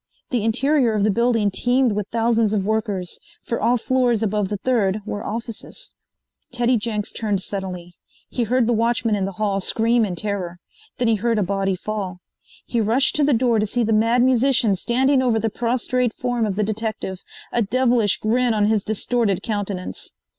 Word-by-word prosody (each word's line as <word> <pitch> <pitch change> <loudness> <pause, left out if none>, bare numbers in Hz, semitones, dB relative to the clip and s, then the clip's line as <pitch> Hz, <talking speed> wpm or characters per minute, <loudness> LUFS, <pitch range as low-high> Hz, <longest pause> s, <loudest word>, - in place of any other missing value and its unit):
The 240 -5 0
interior 255 +2 +2
of 205 - +1
the 215 - +3
building 230 -1 +2
teemed 245 +3 +2
with 205 -1 -2
thousands 230 -2 +1
of 200 -3 0
workers, 210 -4 -2 0.2
for 235 - -3
all 245 +1 +3
floors 245 -2 +1
above 210 -2 0
the 205 - -2
third 215 -3 0
were 205 -1 -4
offices. 230 - -6 0.6
Teddy 245 0 +2
Jenks 210 -2 -2
turned 210 -3 -1
suddenly. 180 -4 -5 0.3
He 240 - -2
heard 250 +2 +2
the 240 - +1
watchman 230 0 +1
in 200 -2 0
the 195 - -4
hall 205 -1 -1
scream 230 +4 +2
in 190 -4 -2
terror. 185 -3 -3 0.4
Then 245 - 0
he 225 -1 +3
heard 230 +2 0
a 210 - +2
body 195 0 -1
fall. 195 -1 -4 0.5
He 235 - -1
rushed 235 +6 +2
to 300 - +3
the 290 - +3
door 235 -2 +2
to 210 - 0
see 240 +4 0
the 225 0 +1
Mad 230 +3 +3
Musician 255 -4 +3
standing 260 +6 +2
over 245 -3 +2
the 220 0 -1
prostrate 245 +1 -1
form 245 -3 -1
of 195 - -2
the 210 - 0
detective, 215 -3 -3 0.3
a 240 - +1
devilish 235 -1 +2
grin 235 +1 +1
on 210 -1 +2
his 215 -1 +1
distorted 215 -2 0
countenance. 200 -4 -4
220 Hz, 185 wpm, -22 LUFS, 205-240 Hz, 0.6 s, the